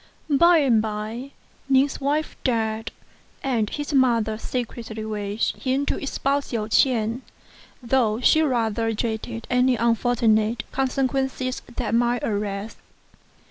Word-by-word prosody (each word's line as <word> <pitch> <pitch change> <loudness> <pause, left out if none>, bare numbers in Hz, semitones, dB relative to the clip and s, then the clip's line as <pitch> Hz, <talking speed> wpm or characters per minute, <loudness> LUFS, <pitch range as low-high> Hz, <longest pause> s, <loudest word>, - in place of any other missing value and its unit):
By 340 +5 +6
and 255 -8 +4
by, 220 +4 -4 0.4
Ning's 270 +1 +3
wife 295 +3 -1
died, 225 -3 -1 0.5
and 230 -6 0
his 290 0 -4
mother 235 -5 +3
secretly 230 -3 -5
wished 210 0 -2
him 265 +2 0
to - - -1
espouse 280 0 -1
Hsiao 220 -3 -3
ch'ien, 230 0 +2 0.6
though 235 -3 +2
she 315 +5 +4
rather 230 -5 0
dreaded 225 +1 -3
any 250 +1 +3
unfortunate 230 -1 +2
consequences 265 -1 -1
that 235 -3 -2
might 240 0 +2
arise. 205 0 -3
235 Hz, 115 wpm, -24 LUFS, 220-265 Hz, 0.6 s, By